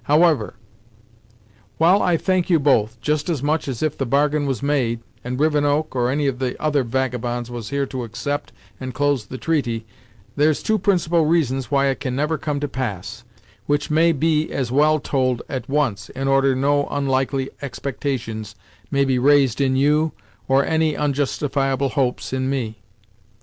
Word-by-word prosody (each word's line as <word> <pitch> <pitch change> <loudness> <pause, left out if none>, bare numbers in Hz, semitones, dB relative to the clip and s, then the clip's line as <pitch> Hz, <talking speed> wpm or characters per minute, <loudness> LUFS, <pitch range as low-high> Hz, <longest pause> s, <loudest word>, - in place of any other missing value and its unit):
However, 150 -6 +3 1.2
while 175 +5 +4
I 175 -2 +2
thank 185 +1 0
you 170 - +5
both, 120 -5 +2
just 150 +3 -1
as 150 -6 -1
much 150 +1 0
as 130 -2 -3
if 155 -2 0
the 135 - -2
bargain 145 +2 +2
was 135 -2 -2
made, 125 -5 0 0.2
and 125 +1 -4
Rivenoak, 150 -1 +1
or 120 -1 +1
any 145 +2 0
of 135 -2 -1
the 130 -2 -2
other 150 -2 +1
vagabonds, 120 -1 -2
was 120 -3 -6
here 140 0 0
to 130 -2 -5
accept 145 +5 -4 0.3
and 130 -2 -6
close 145 -6 0
the 130 - -6
treaty, 120 -8 -1 0.5
there's 150 +1 +2
two 220 -1 +1
principal 175 -4 +2
reasons 135 -6 +1
why 140 -1 +2
it 135 -1 0
can 130 -3 -3
never 150 +2 0
come 145 -1 -2
to 145 - -1
pass, 110 -4 -5 0.4
which 145 +1 0
may 165 +2 +4
be 155 +1 +1
as 130 -4 -2
well 155 +3 +4
told 130 -4 0
at 130 -2 -5
once, 135 -9 0
in 135 +1 -4
order 135 -1 +3
no 145 +2 +2
onlikely 135 -1 -1
expectations 120 -6 -4 0.3
may 140 0 +2
be 130 -2 +1
raised 140 -1 +4
in 130 -1 +2
you, 150 +3 +2 0.3
or 135 +1 +3
any 160 -1 +1
onjustifiable 140 -1 0
hopes 130 -2 -1
in 130 0 -1
me." 120 -5 -3
140 Hz, 170 wpm, -21 LUFS, 130-150 Hz, 1.2 s, you